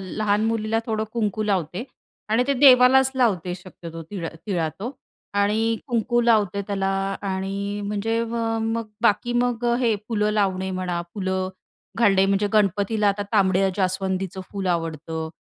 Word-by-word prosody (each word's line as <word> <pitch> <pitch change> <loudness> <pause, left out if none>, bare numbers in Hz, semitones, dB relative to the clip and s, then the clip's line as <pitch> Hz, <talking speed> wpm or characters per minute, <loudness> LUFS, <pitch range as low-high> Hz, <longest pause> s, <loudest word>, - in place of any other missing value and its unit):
लहान 205 +3 0
मुलीला 225 0 0
थोडं 220 -2 -1
कुंकू 215 -2 -1
लावते 190 0 -1 0.4
आणि 220 +3 +3
ते 280 - +2
देवालाच 260 0 +6
लावते 185 -8 +1
शक्यतो 170 -2 -10
तीळ 185 -5 -4
अ, - - -11
टिळा 175 -5 0
तो 225 +6 -4 0.5
आणि 220 +3 +2
कुंकू 240 -1 +1
लावते 210 -4 +2
त्याला 195 -1 -1 0.4
आणि 200 +2 -3
म्हणजे 220 +3 -1
म 230 - -5 0.4
मग 230 -1 -3 0.2
बाकी 210 +4 +2
मग 245 -1 -1
अ, 240 0 +3
हे 230 -3 +3
फुलं 210 -2 +1
लावणे 190 -2 0
म्हणा, 185 -2 -2
फुलं 190 -2 -1 0.5
घालणे, 195 -4 +4
म्हणजे 200 +1 +2
गणपतीला 205 +1 +2
आता 200 +1 0
तांबड्या 195 -2 +3
जास्वंदीचं 190 -1 -1
फुल 195 -2 -3
आवडतं 160 -1 -3
205 Hz, 150 wpm, -23 LUFS, 190-225 Hz, 0.5 s, देवालाच